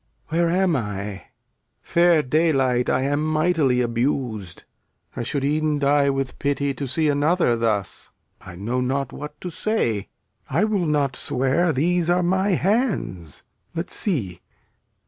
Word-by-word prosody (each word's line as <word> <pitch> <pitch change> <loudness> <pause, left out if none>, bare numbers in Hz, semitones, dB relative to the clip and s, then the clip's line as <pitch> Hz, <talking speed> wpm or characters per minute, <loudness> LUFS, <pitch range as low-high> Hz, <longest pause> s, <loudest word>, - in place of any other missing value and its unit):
Where 170 +1 +1
am 180 -1 +2
I? 105 -4 -4 0.6
Fair 170 -2 +3
daylight, 135 -4 +2
I 130 - +2
am 145 +2 0
mightily 155 -5 +2
abus'd. 120 - -2 0.5
I - - -3
should 135 +4 -2
e'en 155 +1 +1
die 140 0 +3
with 135 -1 -2
pity, 140 0 0
To 140 0 -5
see 155 +5 +1
another 145 -1 +2
thus. 110 -4 -2 0.3
I 90 - -11
know 115 +8 -2
not 135 +1 -1
what 150 0 -8
to 180 - -5
say. 135 - -1 0.4
I 165 +9 +2
will 205 -5 +1
not 145 -3 +1
swear 135 +9 +1
these 170 +4 +1
are 180 +1 +3
my 190 +3 +1
hands. 185 - -1 0.3
Let's 165 +2 -3
see. 110 - 0
145 Hz, 140 wpm, -23 LUFS, 125-170 Hz, 0.6 s, Fair